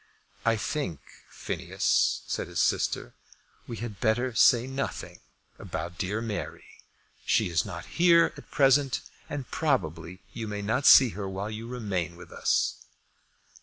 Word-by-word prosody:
"I 115 - +4
think, 100 - -3 0.3
Phineas," - - 0
said - - -3
his - - -4
sister, - - 0 0.5
"we 115 - -6
had 110 -3 -6
better 120 +2 +1
say 120 +2 +5
nothing 135 +1 -5 0.4
about 85 0 -6
dear 100 +3 -2
Mary. 110 -3 -5 0.6
She - - +1
is 80 -4 +1
not - - -7
here 170 -1 +4
at - - -13
present, 135 -1 +3 0.3
and 140 -3 -6
probably 90 - -1
you 115 -2 -5
may 105 -1 -4
not 125 +7 +1
see 130 -2 +9
her 100 -2 -5
while 100 +3 -4
you 110 +2 -6
remain 100 -8 -3
with 85 - -13
us." - - 0
110 Hz, 140 wpm, -27 LUFS, 95-130 Hz, 0.6 s, see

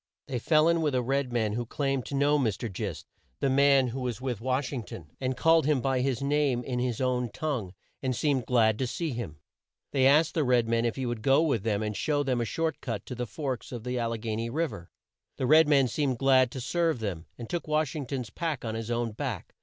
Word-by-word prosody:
They 125 -2 -2
fell 155 +5 +4
in 170 0 +3
with 150 -4 +1
a 125 - +2
red 135 +1 0
man 110 -3 0
who 120 +2 -1
claimed 135 -1 -1
to 140 - -4
know 145 +2 +3
Mr. 110 -3 -1
Gist, 95 -4 -4 0.3
the 135 - +1
man 140 -1 +4
who 130 +3 -5
was 120 -4 -3
with 125 -4 -3
Wash 130 +2 -1
ing 130 - -2
ton, 80 -7 -10
and 130 -1 -1
called 165 -1 +4
him 150 -3 +3
by 130 0 0
his 135 0 -1
name 140 -3 +1
in 125 -1 -3
his 125 -2 -1
own 125 -2 0
tongue 115 -9 -3 0.3
and 130 -2 -1
seemed 135 -2 0
glad 110 -3 +3
to 130 - 0
see 160 +5 -3
him. 115 - -5 0.5
They 135 -2 +4
asked 150 +3 +4
the 160 - +1
red 125 -3 +3
man 115 0 +1
if 115 - 0
he 130 - -3
would 120 -2 -3
go 135 +6 +4
with 135 -10 +1
them 105 0 0
and 105 -1 -3
show 145 +3 0
them 130 -3 0
a - - 0
short 160 +9 -2
cut 115 -6 -4
to - - -6
the 125 0 -4
Forks 130 +1 -4
of 120 -3 -6
the 125 0 -2
Al 115 -1 0
le 115 - -2
gha 110 -1 -3
ny 115 +1 -2
Riv 160 +5 -1
er. 85 0 -10 0.5
The 130 - -1
red 155 +3 +6
man 140 -3 +4
seemed 130 0 -1
glad 130 -1 +4
to 130 +2 -6
serve 165 +3 +1
them, 95 -7 -4
and 120 - -7
took 170 +3 -3
Wash 155 -1 0
ing 145 -4 -4
ton's 125 -6 -4
pack 160 -4 -3
on 110 - -2
his 115 0 -4
own 120 -1 -1
back. 115 - -5
130 Hz, 255 wpm, -28 LUFS, 115-140 Hz, 0.5 s, red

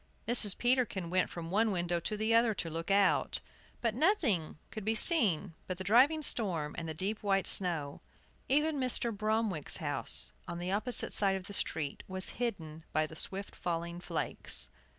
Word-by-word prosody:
Mrs. 220 -4 +5
Peterkin 240 -8 0
went 185 0 +1
from 165 -1 -8
one 220 +3 +2
window 175 -3 -1
to 210 +5 -3
the 220 +2 0
other 230 -1 +3
to 165 - -4
look 165 +3 -6
out; 195 -1 +2 0.4
but 230 -2 0
nothing 260 - 0
could 215 - -7
be 220 +2 -1
seen 205 - +5
but 185 - -4
the 190 - -6
driving 260 - +3
storm 170 - -2
and 165 -1 -6
the 160 - -6
deep 195 +6 -2
white 195 -2 0
snow. 165 -7 +1 0.5
Even 300 +1 +1
Mr. 245 -3 -1
Bromwick's 215 -6 +1
house, 145 -3 +2 0.2
on 170 -1 -6
the 175 +2 -4
opposite 220 +5 +1
side 195 -2 +4
of 190 -1 -6
the 200 - -9
street, 155 -7 -2
was 190 0 -3
hidden 165 -9 -4
by 155 0 +1
the 160 - -11
swift 195 +4 -4
falling 170 0 -4
flakes. 60 - -1
195 Hz, 175 wpm, -31 LUFS, 170-225 Hz, 0.5 s, Mrs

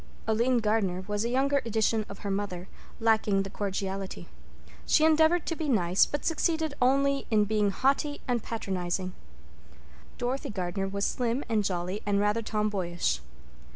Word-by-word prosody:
Aline 235 +3 +2
Gardner 205 -4 0
was 205 0 -1
a 235 - -1
younger 275 +2 +2
edition 220 -1 0
of 200 - -10
her 200 - -1
mother, 195 -2 -3 0.3
lacking 220 -3 +2
the 195 - -7
cordiality. 195 - -4 0.6
She 310 - +5
endeavored 320 +2 +4
to 330 - -2
be 310 -2 -3
nice, 185 -6 +3
but 290 - -4
succeeded 320 -2 0
only 275 +2 +2
in 215 -2 +4
being 210 -1 +1
haughty 275 +7 +1
and 245 -2 +1
patronizing. 185 -4 -3 1.0
Dorothy 250 +3 -2
Gardner 195 -1 -2
was 200 +1 -2
slim 245 +2 -1
and 220 -2 +1
jolly 185 +2 -2
and 200 -1 +1
rather 210 +2 +1
tomboyish. 190 - -1
215 Hz, 150 wpm, -28 LUFS, 195-255 Hz, 1.0 s, She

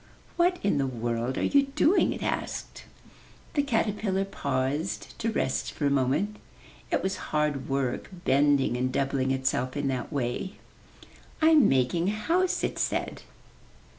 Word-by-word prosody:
''What 350 +1 +3
in 200 -8 +2
the 135 - +1
world 120 0 -2
are - - 0
you 280 -1 +3
doing?'' 350 +6 +4
it - - -5
asked. - - -4 0.7
The 290 - +3
caterpillar 210 -6 0
paused 140 -1 -2
to 225 - 0
rest 130 - -1
for 145 - -2
a 140 - +3
moment. 140 +11 +1 0.5
It - - 0
was 190 0 -1
hard 150 -3 0
work, 135 -2 -1 0.2
bending 140 -2 +3
and 130 +1 0
doubling 135 0 0
itself 130 0 0
in 145 -1 0
that 130 +2 -3
way. 140 +7 -2 0.9
'Tm 315 -5 +6
making 135 +7 +2
a - - 0
house,'* 345 - 0
it - - -2
said. - - -1
145 Hz, 145 wpm, -27 LUFS, 130-210 Hz, 0.9 s, Tm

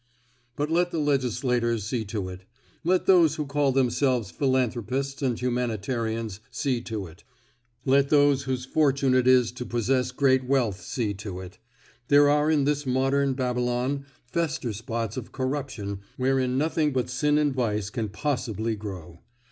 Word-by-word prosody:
But 150 +2 -2
let 175 +2 +2
the 170 - -4
legislators 125 -5 0
see 110 +2 -2
to 100 -2 -4
it; 90 0 -9 0.4
let 180 +2 +2
those 175 -5 +5
who 150 - -3
call 140 0 +1
themselves 125 -4 +1
philanthropists 130 +1 -1
and 125 -4 0
humanitarians 115 -3 -2
see 125 0 -1
to 110 -5 -5
it; 85 0 -14 0.6
let 140 +1 +3
those 145 -2 +4
whose 130 -1 -2
fortune 140 -2 +2
it 130 -1 +3
is 125 -2 +5
to 125 +1 -6
possess 125 +2 0
great 130 0 +3
wealth 125 -7 0
see 110 -5 -2
to 100 -2 -7
it. 95 +2 -11 0.5
There 145 0 +6
are 150 +1 +3
in 150 -3 +3
this 145 +1 0
modern 135 +1 +1
Babylon 125 +2 -1 0.2
fester 130 -4 -2
spots 115 +1 -4
of 125 - -6
corruption 130 -7 -3 0.2
wherein 130 0 +1
nothing 150 0 +1
but 125 -1 0
sin 145 +4 +1
and 150 -2 +2
vice 105 -5 -1
can 115 -4 -3
possibly 115 -2 -2
grow. 90 -5 -8
130 Hz, 155 wpm, -26 LUFS, 115-140 Hz, 0.6 s, There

